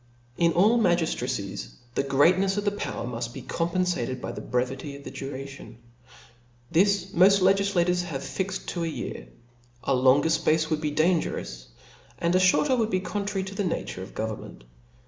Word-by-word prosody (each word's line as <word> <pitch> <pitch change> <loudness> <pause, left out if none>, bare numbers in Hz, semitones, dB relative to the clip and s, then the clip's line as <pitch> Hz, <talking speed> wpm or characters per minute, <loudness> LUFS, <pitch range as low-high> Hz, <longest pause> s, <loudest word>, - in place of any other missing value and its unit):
In 170 +4 +3
all 215 +7 +4
magiftracies, 160 - -1 0.2
the - - 0
greatnefs^ 180 +8 +3
of 205 - -1
the 205 - +2
power 205 - -4
muft 120 -1 -4
be - - -8
compenfated 170 -7 -1
by - - -5
the - - -7
brevity 130 +3 -2
of 140 - -11
the - - -8
duration. 135 -3 -8 0.9
This 190 +2 +2
moft 195 +3 +5
Icgiflators 185 -2 +2
have 145 -6 -5
fixed 190 0 -4
to 175 - -3
a - - -1
year; - - -5 0.6
a 135 - +1
longer 130 +4 +4
fpace 160 0 +2
would 155 -1 0
be 150 - 0
dangerous, 155 - 0 0.5
and 170 +1 0
a 185 - +4
fhorter 220 +9 +4
would 220 -1 +1
be 185 - +1
contrary 200 0 -3
to 190 +1 -7
the 200 - -2
nature 165 - -3
of 95 - -10
government. 110 - -5
170 Hz, 165 wpm, -26 LUFS, 135-190 Hz, 0.9 s, moft